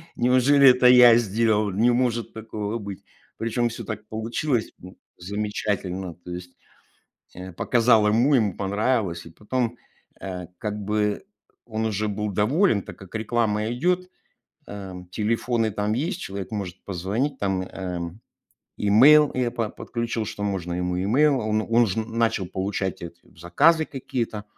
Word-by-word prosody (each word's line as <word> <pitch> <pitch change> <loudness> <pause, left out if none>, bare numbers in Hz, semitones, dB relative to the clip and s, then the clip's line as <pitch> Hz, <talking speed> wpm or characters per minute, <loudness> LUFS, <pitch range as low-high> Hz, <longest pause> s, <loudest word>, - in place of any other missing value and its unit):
Неужели 130 +3 +5
это 125 0 +5
я 125 -2 +8
сделал? 110 -1 +1
Не 115 +6 +3
может 120 -2 0
такого 110 0 -4
быть". 100 -3 -8 0.3
Причём 120 +1 0
всё 115 +1 -7
так 110 0 -6
получилось, 115 +3 -2
ну, 90 +1 -12 0.2
замечательно. 95 -2 -3
То 90 - -7
есть, 90 0 -8 0.8
э, 90 +1 -8
показал 115 +3 +3
ему, 120 +7 +3
ему 105 -7 +2
понравилось. 100 -3 -1
И - - -10
потом, 120 +6 -3 0.4
э, 90 -2 -6
как 105 -1 -3
бы 105 0 -1 0.4
он 110 -1 -3
уже 110 0 -1
был 105 0 -3
доволен, 110 - +2
так - - -11
как 95 -2 -14
реклама 110 -1 0
идёт, 175 +12 0 0.6
эм. 95 -3 -8
Телефоны 115 +1 0
там 105 +1 -1
есть, 155 - -2
человек 100 0 -6
может 95 -4 -5
позвонить, 105 - -2
там, 95 -2 0
эм, 90 0 -6 0.6
email 140 +9 +6
я 125 -2 0
по 115 -3 -2
подключил, 115 0 -4
что 105 -1 -6
можно 95 -4 -2
ему 90 0 -2
email. 130 +8 +2
А - - -4
он 110 0 +1
он 115 +2 +3
уже 110 -1 -1
начал 115 -2 -1
получать 95 0 -3
эти 85 0 -9
заказы 150 - +3
какие-то. 125 -6 -4
110 Hz, 145 wpm, -24 LUFS, 95-120 Hz, 0.8 s, я